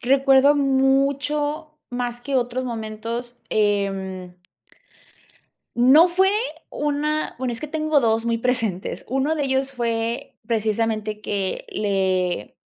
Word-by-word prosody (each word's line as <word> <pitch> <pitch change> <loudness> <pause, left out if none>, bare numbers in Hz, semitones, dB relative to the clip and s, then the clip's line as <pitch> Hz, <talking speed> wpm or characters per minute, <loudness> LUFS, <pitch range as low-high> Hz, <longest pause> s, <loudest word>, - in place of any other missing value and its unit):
recuerdo 270 +2 +5
mucho 280 +3 +1
más 245 -1 -3
que 280 +2 -4
otros 250 +1 -1
momentos, 230 +1 -5
em. 195 -3 -1 1.4
No 270 +8 +7
fue 375 +2 +3 0.4
una 295 +1 -1
bueno, 255 -1 -2
es 230 - -7
que 305 - -4
tengo 310 -1 +1
2 225 -1 +1
muy 230 0 +1
presentes. 225 -6 -2
Uno 270 +5 +1
de 295 -2 -1
ellos 265 0 0
fue, 235 0 -2
precisamente, 220 -1 -1
que 195 -3 -2
le 185 - -1
245 Hz, 115 wpm, -22 LUFS, 215-275 Hz, 1.4 s, No